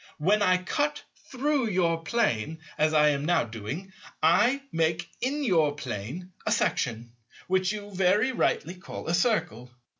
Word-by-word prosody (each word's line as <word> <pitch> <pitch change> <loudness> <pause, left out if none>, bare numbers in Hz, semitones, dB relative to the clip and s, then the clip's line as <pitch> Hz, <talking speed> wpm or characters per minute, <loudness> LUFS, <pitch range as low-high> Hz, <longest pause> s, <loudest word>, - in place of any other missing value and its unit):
When 200 +7 +2
I 185 -2 +4
cut 290 +11 -2 0.3
through 275 -1 0
your 170 -5 +1
plane 160 - 0 0.2
as 155 0 +2
I 150 -1 +5
am 140 -1 0
now 175 +3 +2
doing, 115 - -7 0.3
I 240 - +4
make 165 0 0
in 285 +4 -1
your 160 - +2
plane 135 - -6
a 215 - -1
section 120 - -1 0.3
which 185 0 +1
you, 205 -1 -7
very 190 +7 +3
rightly, 175 -8 0
call 185 0 -9
a 165 - 0
Circle. 175 - 0
180 Hz, 150 wpm, -27 LUFS, 150-215 Hz, 0.3 s, I